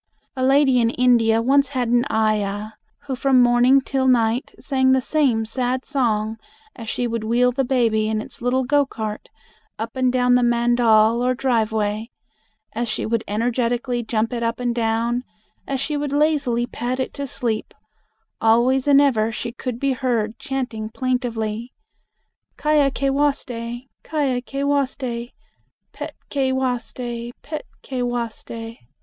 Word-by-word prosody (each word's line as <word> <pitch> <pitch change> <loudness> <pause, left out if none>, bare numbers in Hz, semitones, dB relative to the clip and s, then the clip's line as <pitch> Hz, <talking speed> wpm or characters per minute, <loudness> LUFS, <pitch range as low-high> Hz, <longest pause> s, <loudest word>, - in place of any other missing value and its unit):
A 260 - -2
lady 270 -1 +4
in 230 -1 +3
India 230 -2 +3
once 275 +3 +4
had 255 -4 -2
an 240 +1 +3
ayah, 215 -1 0 0.3
who 270 -2 -3
from 265 0 +3
morning 245 +1 +5
until 265 -1 +1
night 235 0 +2
sang 260 -1 +2
the 265 - +4
same 255 -5 +1
sad 250 +3 -2
song 225 -5 0 0.4
as 225 -3 -7
she 245 - -1
would 230 -2 -2
wheel 240 +3 +3
the 270 +2 0
baby 230 -4 +1
in 220 0 0
its 215 - -8
little 250 +2 +1
go 285 +3 +3
cart 215 -5 -6 0.5
up 225 +2 -5
and 255 -1 +2
down 250 -1 +3
the 250 - +4
mandal 235 -1 +3
or 255 0 +2
driveway; 220 -3 0 0.6
as 235 +1 -2
she 215 - -2
would 230 0 0
energetically 240 +3 0
jump 225 +1 -1
it 235 - -2
up 230 +1 -1
and 245 -1 0
down; 235 +1 0 0.4
as 270 -1 -2
she 290 +3 -2
would 290 -1 -2
lazily 285 -5 +1
pat 245 +1 -4
it 260 - -2
to 280 -1 -5
sleep, 230 -4 -3 0.7
always 245 +4 +3
and 280 -1 +7
ever 225 -6 +2
she 235 +1 -4
could 245 0 -5
be 275 0 +1
heard 235 -4 -1
chanting 245 -5 -4
plaintively, 235 -2 -2 0.8
"Ky 305 0 +2
a 280 -1 +4
ke 275 0 -1
waste, 285 -1 0
Ky 235 0 -4 0.3
a 275 -5 0
ke 275 +3 -4
waste, 255 -4 -1 0.6
pet - - -7 0.2
ke 270 -2 +1
waste, 255 -2 -2 0.5
pet 305 +1 -6 0.2
ke 260 -2 -4
waste." 230 -1 -4
245 Hz, 155 wpm, -22 LUFS, 230-265 Hz, 0.8 s, and